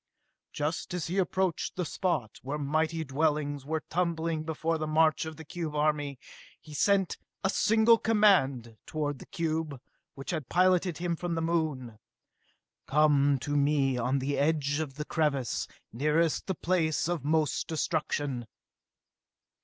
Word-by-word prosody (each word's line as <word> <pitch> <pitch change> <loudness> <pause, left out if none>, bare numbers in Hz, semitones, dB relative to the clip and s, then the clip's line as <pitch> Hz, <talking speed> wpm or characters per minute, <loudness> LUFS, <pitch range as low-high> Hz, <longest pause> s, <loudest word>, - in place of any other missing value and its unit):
Just 160 +4 -3
as 175 - -2
he 185 +4 -1
approached 185 -2 0
the 180 - -2
spot 145 - -2
where 140 +3 -3
mighty 155 +3 0
dwellings 145 -1 -1
were 160 0 -2
tumbling 165 -2 -1
before 160 +1 -2
the 155 - -2
march 155 +1 +3
of 160 -1 -7
the 160 - -10
cube 160 -2 -5
army, 150 -2 0 0.4
he 155 - -13
sent 195 +5 +2 0.3
a 195 - +2
single 225 +2 +4
command 140 - +3
toward 145 -3 -2
the - - -12
cube 160 -4 -2 0.4
which 135 +4 -5
had 155 -7 -4
piloted 180 -1 +3
him 175 -1 -1
from 175 0 -3
the 165 - -1
Moon. 150 -9 -1 0.9
"Come 145 -1 +4
to 145 +1 -2
me 140 -2 +2
on 125 +3 0
the 140 +2 -1
edge 145 -1 +1
of 145 -4 -4
the 150 +1 -4
crevasse 150 -7 0 0.3
nearest 150 +6 +1
the 190 - -1
place 160 -3 +1
of 170 -5 -2
most 155 0 +1
destruction!" 145 -6 -2
155 Hz, 145 wpm, -29 LUFS, 145-170 Hz, 0.9 s, single